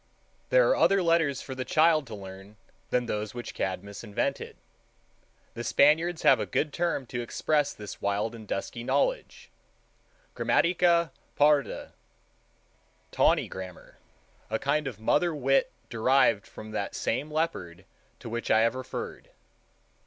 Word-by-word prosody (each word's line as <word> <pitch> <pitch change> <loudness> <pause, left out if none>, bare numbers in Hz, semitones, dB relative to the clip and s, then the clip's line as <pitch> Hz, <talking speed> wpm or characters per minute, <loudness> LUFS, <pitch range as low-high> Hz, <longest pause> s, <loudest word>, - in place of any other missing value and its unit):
There - - +5
are - - +4
other 195 -1 +3
letters 165 -5 +2
for 130 - -6
the 130 0 -4
child 155 0 +3
to 110 - -7
learn 95 +1 -11 0.3
than 125 -1 +1
those 105 -1 -4
which 120 - -6
Cadmus 95 +3 -4
invented. 105 -3 -3 1.0
The 120 - -6
Spaniards 160 +7 +3
have - - +6
a - - -2
good 150 -2 -1
term 170 -6 -1
to 120 0 -4
express 145 +5 0
this 105 -1 -9
wild 100 +3 -1
and 110 -2 -11
dusky 115 +4 -4
knowledge—Gramatica 175 - -1 0.3
parda—tawny 145 -1 -1
grammar, 95 -2 -10 0.5
a 110 - 0
kind 145 +3 0
of 115 -6 -6
mother 155 +9 +1
wit 135 -1 +2 0.2
derived 115 -3 +3
from 110 0 -10
that 100 -2 -3
same 140 +7 -2
leopard 95 - -3 0.4
to - - -8
which 115 +1 -4
I 110 - +5
have 115 +1 +3
referred. 130 0 -7
130 Hz, 130 wpm, -28 LUFS, 110-155 Hz, 1.0 s, have